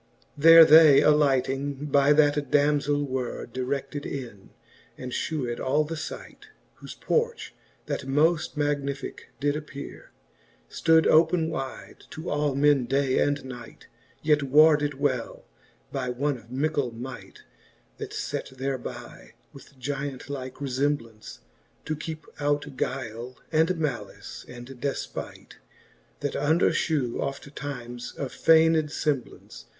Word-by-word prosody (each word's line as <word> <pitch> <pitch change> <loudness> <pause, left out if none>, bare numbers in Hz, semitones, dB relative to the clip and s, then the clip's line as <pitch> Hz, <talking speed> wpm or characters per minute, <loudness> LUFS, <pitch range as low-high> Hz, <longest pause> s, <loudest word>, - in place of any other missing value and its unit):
XXII. 145 - -12
There 165 +1 +10
they 155 -2 +8
alighting 140 -1 +2
by 140 0 +3
that 145 -2 +3
damzell 145 0 +2
were 130 -2 -4
Direded 135 +4 -4
in, 120 -8 -7 0.5
and 125 - -7
fhevved 125 -5 -3
all 145 +4 +1
the 160 +2 -5
fight: 155 - -8 0.3
Whofe - - -10
porch, 470 0 -1 0.3
that - - -4
moft 150 +4 +1
magnificke 145 -2 -3
did 145 0 +1
appeare, 150 -2 -8 0.6
Stood 160 -1 +3
open 160 0 +4
wyde 135 -3 -7
to 160 +3 -6
all 145 -2 0
men 140 -2 +3
day 135 +1 +1
and 145 -1 0
night; 125 -3 -10 0.4
Yet 150 -1 +3
warded 150 +1 +4
well 135 -4 -2 0.5
by 130 -2 -3
one 140 +3 -1
of 115 +1 -20
mickle 140 0 -1
might, 125 +2 -9 0.6
That - - -6
fat - - -4
thereby, 135 0 -6 0.2
with 140 0 -15
giant 140 +1 -5
like 130 -2 -6
refemblance, 135 -5 -3 0.4
To 155 - -2
keepe 155 +1 -7
out 145 -1 -1
guyle, 125 -1 -4 0.2
and 165 +3 +2
malice, 150 -7 -5
and 120 0 -9
defpight. 135 +1 -6 0.6
That - - -2
under 160 +4 +2
fhew 140 -8 -1
oftimes 135 -3 -6
of 135 -3 -4
fayned 160 0 +5
femblance. 145 -3 -4
140 Hz, 125 wpm, -26 LUFS, 130-150 Hz, 0.6 s, There